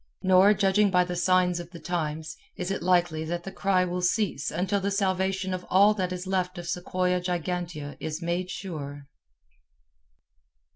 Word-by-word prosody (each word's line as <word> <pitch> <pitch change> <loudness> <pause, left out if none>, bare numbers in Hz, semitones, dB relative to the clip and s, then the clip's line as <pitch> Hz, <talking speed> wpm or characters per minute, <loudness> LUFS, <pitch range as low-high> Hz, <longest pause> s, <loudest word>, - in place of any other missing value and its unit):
Nor, 190 +3 +6
judging 200 +1 +3
by 180 -1 +4
the 180 0 -4
signs 180 0 +2
of 175 -1 -8
the 170 -1 -11
times, 160 -1 -3 0.2
is 180 +1 -3
it 195 - -2
likely 175 -3 +2
that 170 +1 -3
the 195 - -6
cry 190 -1 +1
will 180 0 -3
cease 180 -4 0
until 185 +5 0
the 195 +1 -1
salvation 190 -1 0
of 180 0 -4
all 200 +3 +6
that 185 -3 -2
is 180 0 -4
left 185 -1 -1
of 175 0 -6
Sequoia 180 +1 0
gigantea 175 -4 -3
is 155 0 -4
made 175 +1 -2
sure. 145 -8 -6
180 Hz, 165 wpm, -27 LUFS, 175-190 Hz, 0.2 s, Nor